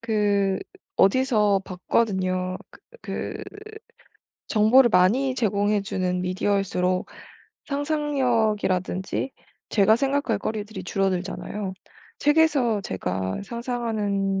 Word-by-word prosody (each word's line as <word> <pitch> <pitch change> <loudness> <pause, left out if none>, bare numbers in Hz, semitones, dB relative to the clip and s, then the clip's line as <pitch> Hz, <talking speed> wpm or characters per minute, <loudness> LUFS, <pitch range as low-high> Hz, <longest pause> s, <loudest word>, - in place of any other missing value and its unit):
그 200 -3 +1 0.4
어디서 210 -3 +3
봤거든요. 185 -1 -1
그 - - -17 0.2
그 - - -5 1.1
정보를 235 +3 +5
많이 230 +9 +3
제공해 210 -3 +1
주는 185 -2 -2
미디어일수록 185 -1 0 0.6
상상력이라든지 245 - 0 0.4
제가 215 +1 +4
생각할 275 -4 0
거리들이 215 +1 -4
줄어들잖아요. 190 +1 -2 0.4
책에서 290 -8 +3
제가 95 - -3
상상하는 215 -5 -2
205 Hz, 240 characters per minute, -24 LUFS, 190-240 Hz, 1.1 s, 정보를